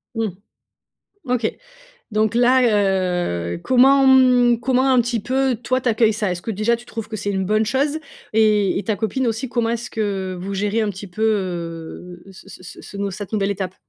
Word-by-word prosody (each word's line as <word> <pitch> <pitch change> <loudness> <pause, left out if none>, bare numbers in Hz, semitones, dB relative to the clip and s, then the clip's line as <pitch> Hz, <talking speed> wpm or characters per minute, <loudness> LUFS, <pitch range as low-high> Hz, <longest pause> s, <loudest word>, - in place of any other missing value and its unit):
Mmh. 225 -1 0 1.0
OK, 245 -3 0 0.6
donc 215 +1 +1
là, 250 +2 +4
heu, 180 - 0
comment, 270 +2 +5
mmh, 250 -3 +5
comment 260 +1 +1
un 255 - +5
petit 240 -1 -2
peu, 260 +2 0
toi, 255 +2 -1
tu 250 - 0
accueilles 220 -1 +3
ça? 205 -3 -1
Est-ce 175 -1 -5
que 225 - -3
déjà 215 +3 +1
tu 235 +1 -13
trouves 225 -2 -7
que 225 - -6
c'est 205 0 -3
une 190 -1 -1
bonne 215 +2 +1
chose 280 +6 0 0.4
et 210 -3 +3
et 200 - -3
ta 215 -3 -1
copine 225 +5 -2
aussi, 230 +3 -2
comment 235 -2 0
est-ce 235 +1 -4
que 195 -4 -3
vous 195 +2 -5
gérez 210 +3 0
un 215 - 0
petit 190 +1 -9
peu, 185 +5 -8
heu, 175 -3 -3
ce 190 - -15
ce - - -13
ce 180 - -11
ce 200 - -10
ce 200 0 -1
cette 205 +2 -8
nouvelle 200 -1 0
étape? 190 -2 -4
215 Hz, 205 wpm, -20 LUFS, 195-240 Hz, 1.0 s, comment